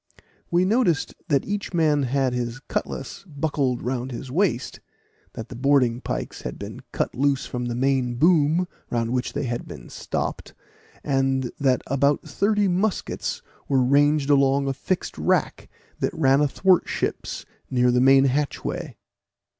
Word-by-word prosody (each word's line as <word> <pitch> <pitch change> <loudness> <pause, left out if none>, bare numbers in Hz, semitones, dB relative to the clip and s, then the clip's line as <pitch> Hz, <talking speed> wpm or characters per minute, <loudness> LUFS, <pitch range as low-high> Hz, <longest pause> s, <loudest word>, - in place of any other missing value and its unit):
We 175 +2 +3
noticed 200 -7 +1
that 140 -3 +2
each 205 -2 -3
man 155 -3 +3
had 135 -1 0
his 120 0 -3
cutlass 135 +3 -5
buckled 140 -5 -1
round 125 +1 -2
his 125 +2 -7
waist 160 -6 0 0.5
that 115 0 -7
the - - -8
boarding 125 -2 +2
pikes - - -4
had - - -6
been - - -7
cut - - -2
loose 140 0 +1
from 125 0 -4
the 120 -1 -3
main 130 -1 +1
boom, 165 +4 +3 0.2
round 115 -1 -1
which 125 0 -1
they - - -2
had 120 -2 -3
been - - -10
stopped, - - -4 0.5
and 135 -2 0
that 130 -3 +2
about 140 +2 +1
thirty 205 0 +1
muskets 190 +3 -1 0.2
were 135 -2 +3
ranged 145 +2 +3
along 140 0 +3
a 135 - 0
fixed 175 +7 -3
rack - - 0 0.3
that - - -1
ran 135 -2 +4
athwart 180 +6 +3
ships - - -3 0.2
near 125 -1 +3
the 125 0 +3
main 135 +1 +6
hatchway. 140 +2 -2
135 Hz, 150 wpm, -24 LUFS, 125-150 Hz, 0.5 s, main